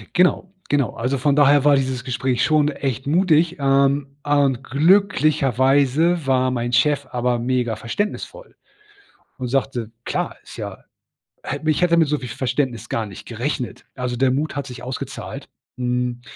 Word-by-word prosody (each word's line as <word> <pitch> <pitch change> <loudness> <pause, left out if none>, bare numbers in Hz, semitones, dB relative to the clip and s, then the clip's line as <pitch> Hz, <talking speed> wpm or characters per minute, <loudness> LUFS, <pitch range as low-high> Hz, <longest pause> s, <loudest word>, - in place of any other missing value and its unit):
Genau, 180 +1 +3 0.2
genau. 140 -7 +1
Also 125 +4 -1
von 140 +2 +2
daher 145 -1 +5
war 145 -1 +6
dieses 130 -2 -1
Gespräch 125 -1 -1
schon 155 -1 +3
echt 135 -3 -3
mutig, 170 +1 +3
ähm. 140 0 +2 0.2
Und 140 -3 +2
glücklicherweise 150 - +3
war 130 -1 +2
mein 120 -1 -2
Chef 140 +2 +2
aber 125 -1 0
mega 120 -1 0
verständnisvoll 210 - -4 0.8
und 130 - -3
sagte: 125 -3 -1 0.2
„Klar - - -2
ist - - -12
ja“ - - -7 0.6
hätte 145 +3 -5
mich 155 -1 +3
ich - - -2
hätte 170 -1 +4
mit 165 -2 +4
so 150 +1 0
viel 130 - -7
Verständnis 125 -1 -2
gar 115 - -1
nicht 100 -3 -11
gerechnet. 125 +2 -4
Also 125 -1 -3
der 130 +1 +2
Mut 150 +4 -2
hat 140 -2 -3
sich 125 - -9
ausgezahlt. 130 +1 -6 0.3
Hm, 125 -1 -1
135 Hz, 160 wpm, -21 LUFS, 125-150 Hz, 0.8 s, war